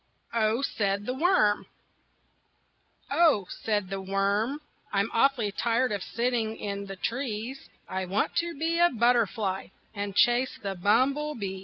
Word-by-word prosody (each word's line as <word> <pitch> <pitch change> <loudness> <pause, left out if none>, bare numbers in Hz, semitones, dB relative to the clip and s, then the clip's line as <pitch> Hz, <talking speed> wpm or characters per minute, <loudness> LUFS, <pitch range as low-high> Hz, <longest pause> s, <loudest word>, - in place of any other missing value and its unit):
OH, 225 +2 +1
SAID 200 -5 -1
THE 250 - -2
WORM 260 - +2 1.4
"Oh," 305 - +4
said 205 -3 -2
the 195 0 -3
worm, 200 +7 0 0.3
"I'm 200 +2 0
awfully 235 -4 +2
tired 235 +4 +1
of 205 -2 -2
sitting 230 0 -1
in 200 -1 -4
the 195 - -6
trees; 235 +3 -4 0.2
I 190 0 -3
want 190 +3 -1
to 340 -2 -1
be 330 +3 0
a 345 0 +6
butterfly 225 - +1 0.3
And 200 -2 -4
chase 245 +1 +3
the 200 -2 -3
bumblebees." 225 +1 +1
220 Hz, 135 wpm, -28 LUFS, 200-260 Hz, 1.4 s, a